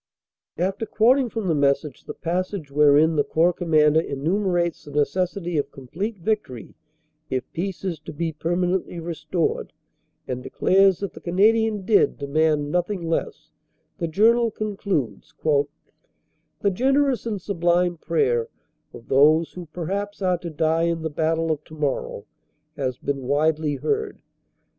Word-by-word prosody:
After 190 +6 -1
quoting 250 +3 +3
from 225 -2 -4
the 165 - +2
message 140 -1 0
the - - -7
passage 180 -2 -3
wherein 150 +2 +5
the 145 - +4
Corps 170 +4 +2
Commander 155 -3 +3
enumerates 170 +4 -1
the - - -12
necessity 170 +3 -1
of 145 - -2
complete 190 - -5
vic 215 +4 0
tory 120 -5 -10 0.6
if 130 -1 -1
peace 185 -1 -4
is 170 -5 -2
to - - -9
be 165 +2 -2
permanently 175 +3 -1
restored 170 0 -2 0.5
and 125 -1 -3
declares 190 +8 +3
that 200 - -4
the - - -11
Canadian 210 +3 +2
dead 210 0 +3
demand 150 +1 +1
nothing 180 0 -1
less, 165 - -3 0.5
the 170 - -1
journal 230 +7 +4
con 215 -1 -4
cludes: 145 - -3 1.3
"The 200 - +2
generous 270 +4 +1
and 210 -3 -2
sublime 175 -1 +1
prayer 125 -8 +1 0.5
of 115 - -13
those 155 +4 +4
who 180 -2 -8
per 165 +2 -6
haps 200 +3 -3
are 180 -2 +1
to 170 - -6
die 160 +1 +1
in 170 -1 -1
the 160 - -2
battle 160 +1 0
of 150 -1 -2
tomorrow 145 -9 -3 0.5
has 130 -4 -2
been 135 -3 -3
widely 150 +1 +1
heard. 425 - -2
170 Hz, 145 wpm, -23 LUFS, 150-195 Hz, 1.3 s, wherein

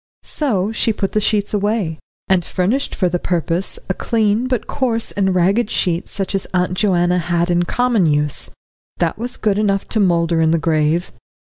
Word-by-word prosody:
So 215 -9 -1
she 225 0 +1
put 195 -2 -2
the 215 - +1
sheets 210 -1 0
away, 205 -6 -1 0.3
and 190 -2 +2
furnished 200 +11 -1
for 185 - +1
the 175 0 -1
purpose 175 +1 -1
a 190 - 0
clean 220 +3 0
but 250 -3 -1
coarse 240 -5 -2
and 190 -2 0
ragged 195 +6 +2
sheet 175 -1 0
such 195 0 -4
as 195 - -1
Aunt 180 0 +1
Joanna 180 -2 +2
had 175 0 0
in 175 0 +2
common 240 -4 +2
use. 150 -1 +1 0.5
That 170 +3 -1
was 245 +2 -4
good 210 -2 +1
enough 195 -2 0
to 220 - 0
moulder 170 -3 +2
in 160 - +3
the 165 - +3
grave. 155 +1 +1
190 Hz, 185 wpm, -18 LUFS, 175-215 Hz, 0.5 s, in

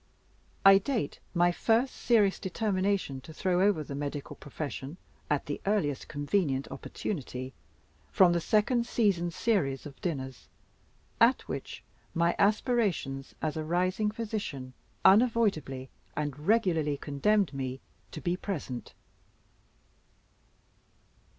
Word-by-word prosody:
I 195 0 +9
date 250 +1 -2 0.2
my 175 0 +4
first 230 +8 +2
serious 210 -5 +3
determination 190 - -1
to 160 - -11
throw 180 +1 +1
over 195 -6 +3
the 140 - -7
medical 145 0 -4
profession 145 +1 -6 0.3
at 145 -2 +1
the 145 - -4
earliest 180 -10 0
convenient 145 -2 0
opportunity, 130 -7 -5 0.6
from 185 -4 +6
the 170 - +1
second 235 +5 +2
season's 180 -8 +1
series 160 - 0
of 140 -2 -11
dinners 135 -7 -4 0.7
at - - +4
which - - -6 0.3
my 170 +1 +2
aspirations, 200 - +1
as 155 -2 -1
a 155 - -2
rising 185 +6 +1
physician, 205 - -4 0.3
unavoidably 190 - +3 0.3
and 150 0 -3
regularly 170 -10 +2
condemned 170 +7 +1
me 130 -1 -4 0.3
to 155 - -7
be 175 0 0
present. 155 - -5
175 Hz, 110 wpm, -29 LUFS, 140-205 Hz, 0.7 s, I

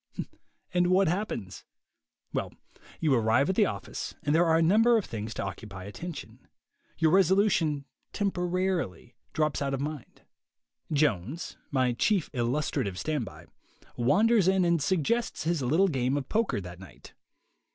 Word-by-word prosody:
And 175 0 +3
what 185 +1 +4
happens?. 160 - -3 0.7
Well, - - -3 0.4
you 155 -4 +2
arrive 115 +6 +3
at - - -4
the 210 -1 +4
office - - -5
and 145 - +1
there 170 +2 +4
are 160 -1 +4
a - - +3
number 225 +7 +5
of 215 - -1
things 110 0 -5
to - - -3
occupy 100 0 -7
attention; 145 - -8 0.5
your 160 -1 +3
resolution, 185 -6 +3 0.3
temporarily, 180 - -1 0.2
drops 155 -2 0
out 140 -1 0
of - - -5
mind. 145 -2 -6 0.7
Jones 145 - 0
(my 130 -3 +1
chief 190 - +1
illustrative 120 -6 -1
standby) 140 -9 -4 0.5
wanders 200 - +3
in 190 -1 +3
and 170 -2 +2
suggests 190 - 0
his 165 -2 0
little 160 +10 +3
game 130 -4 0
of 135 -2 -4
poker 220 - 0
that 90 -2 -9
night. 95 - -14
155 Hz, 140 wpm, -28 LUFS, 125-185 Hz, 0.7 s, number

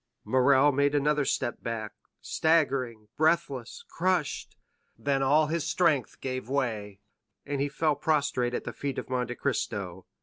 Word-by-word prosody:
Morrel 135 +2 +4
made 140 +1 +2
another 145 0 +2
step 120 -2 -1
back, 110 -2 -4 0.3
staggering, 135 -9 +1
breathless, 155 -6 0
crushed; 180 -3 -1 0.4
then 140 -1 0
all 145 +4 +4
his 155 0 -2
strength 155 -6 +1
give 130 -2 -4
way, 110 -7 -2 0.5
and 140 -1 -2
he 145 - 0
fell 150 +1 +1
prostrate 140 -6 0
at - - -3
the - - -5
feet 140 -2 -4
of - - -5
Monte 125 -1 -1
Cristo. 100 -9 -3
140 Hz, 140 wpm, -28 LUFS, 125-150 Hz, 0.5 s, Morrel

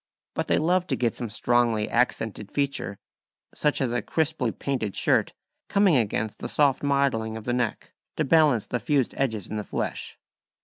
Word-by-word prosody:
But - - -2
they - - +3
love 180 +3 +2
to 135 - 0
get 120 -2 0
some 120 - -4
strongly 115 -1 +1
accented 110 -4 -1
feature, 140 -8 -1 0.6
such 150 -1 0
as 130 -3 0
a 120 -1 0
crisply 135 -4 0
painted 120 -8 -3
shirt - - +2 0.4
coming 200 -5 +4
against 110 -2 0
the - - -4
soft 140 -3 +2
modelling 135 -6 +1
of 110 - -9
the 120 - 0
neck, 125 -3 -2 0.2
to - - +2
balance 145 -7 +4
the 125 - -2
fused 140 -4 +1
edges 110 -7 -1
in 110 - -4
the 105 - -3
flesh. - - -4
125 Hz, 175 wpm, -26 LUFS, 110-140 Hz, 0.6 s, coming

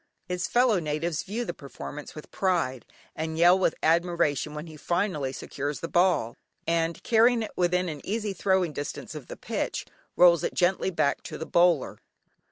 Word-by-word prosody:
His 180 0 -2
fellow 240 -5 +3
natives 155 +1 -2
view 225 +5 -4
the - - -4
performance 145 +1 -9
with 155 - -10
pride, 165 - 0 0.3
and 160 0 -3
yell 175 +3 +6
with 180 - +2
admiration 160 -3 +1
when 150 +2 -5
he 160 -2 -11
finally 170 -4 -1
secures 145 +2 -4
the 165 - -4
ball 175 -11 +2 0.3
and, 165 0 0
carrying 230 0 +4
it 215 - -6
within 180 0 +1
an 150 -4 -6
easy 210 -1 -2
throwing 190 -3 +1
distance 145 0 -5
of - - -8
the - - -8
pitch, - - -3 0.3
rolls 170 -3 +6
it - - -2
gently 185 +1 +2
back 165 -6 0
to - - -7
the 160 - -5
bowler. 170 -5 +2
170 Hz, 175 wpm, -27 LUFS, 150-185 Hz, 0.3 s, yell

